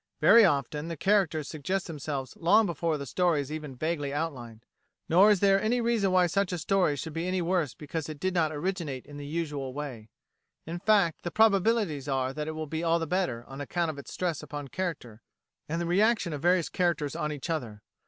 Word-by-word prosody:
Very 230 - +7
often 150 - +1
the 165 -1 -5
characters 175 -6 +1
suggest 175 +5 -2
themselves 145 -4 -5
long 205 +6 +4
before 170 -2 -1
the 140 - -6
story 175 +2 +1
is 140 0 -4
even 150 -4 -6
vaguely 150 0 -2
outlined. 125 -7 -5 0.4
Nor 185 +6 +6
is 205 -3 +3
there 195 -1 +4
any 240 +3 +1
reason 230 -5 +1
why 185 -1 +4
such 195 +2 0
a 180 - -2
story 180 -2 +1
should 150 +3 -6
be 165 +2 -2
any 185 0 0
worse 170 -5 0
because 155 +1 -5
it 155 -2 -7
did 185 +2 -1
not 160 -3 +2
originate 155 -4 -3
in 145 - -11
the 145 0 -7
usual 145 -4 -3
way. 130 -7 -6 0.6
In 170 +2 -5
fact, 200 -5 +2
the 175 - -3
probabilities 200 - +2
are 135 -1 -1
that 150 +1 -4
it 160 - -3
will 155 0 -4
be 160 +2 -4
all 165 0 +3
the 165 - -2
better, 160 -9 -1
on 135 +1 -8
account 170 +3 -1
of 140 - -10
its 140 - -10
stress 175 -4 -2
upon 145 -1 -7
character, 140 -9 -5 0.5
and 165 +2 -1
the 170 - -1
reaction 200 0 +2
of 145 - -5
various 175 0 +2
characters 170 -5 0
on 150 -2 -2
each 145 -1 -6
other. 115 -10 -4
160 Hz, 210 wpm, -28 LUFS, 145-185 Hz, 0.6 s, Very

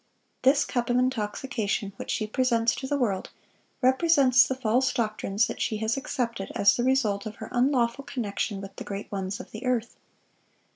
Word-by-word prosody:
This 275 +2 +4
cup 245 -2 -2
of 245 - +3
intoxication 220 -3 -1
which - - -7
she 215 - 0
presents 230 0 +1
to 265 - -5
the 285 - 0
world, 205 -8 -1 0.5
represents 260 -1 +5
the 260 - -2
false 255 +2 +1
doctrines 215 -3 0
that - - -6
she 215 - 0
has 220 +1 0
accepted 235 -7 -3
as 200 - +5
the 240 - -1
result 230 -6 +1
of 215 - -7
her 220 - -8
unlawful 250 0 +1
connection 205 -4 -3
with 195 0 -9
the - - -5
great 200 0 -6
ones 195 0 -3
of - - -10
the 220 - -8
earth. 245 -2 -1
235 Hz, 180 wpm, -27 LUFS, 210-260 Hz, 0.5 s, represents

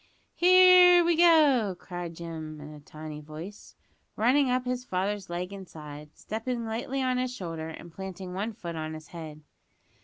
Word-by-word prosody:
"Here 360 0 +7
we 340 0 +3
go," 300 - +5
cried 175 -2 -7
Jim 160 -2 -7
in 150 +1 -10
a 150 - -11
tiny 155 +1 -9
voice, 155 +7 -10 0.4
running 255 +5 +3
up 255 0 0
his 250 0 -2
father's 195 -2 -3
leg 180 +3 -4
and 195 -2 -9
side, 150 -1 -10
stepping 230 +2 -4
lightly 245 +4 -3
on 255 -1 0
his 255 0 -1
shoulder, 165 -6 -5
and 160 +1 -10
planting 190 -1 -7
one 210 +5 -3
foot 170 -5 -7
on 155 0 -4
his 155 -1 -11
head. 155 -3 -9
190 Hz, 165 wpm, -28 LUFS, 160-250 Hz, 0.4 s, Here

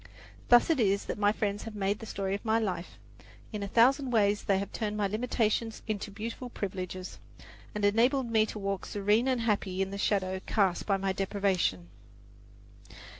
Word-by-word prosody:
Thus 240 +6 +6
it 310 - +1
is 200 -3 +2
that - - -4
my 205 0 +4
friends 205 -1 -2
have 225 -1 -7
made 200 0 -1
the 225 - -8
story 195 -2 -2
of 200 - -3
my 220 -1 +2
life. 185 -6 -3 0.6
In 210 - -3
a 200 - -3
thousand 260 +6 +4
ways 205 -3 +2
they 195 - +3
have 200 +1 -3
turned 210 -1 -3
my 205 - +1
limitations 225 +1 -1
into 210 -2 -3
beautiful 225 +5 -6
privileges, 185 -3 -5 0.6
and 210 -1 0
enabled 235 +4 +2
me 220 -1 +3
to - - -6
walk 195 -2 -3
serene 210 +4 +1
and 255 -3 +1
happy 200 -4 0
in 195 0 0
the 200 - -5
shadow 190 -2 0
cast 195 -5 +1
by 195 -2 +2
my 195 0 -1
deprivation. 190 - 0
205 Hz, 180 wpm, -30 LUFS, 195-225 Hz, 0.6 s, Thus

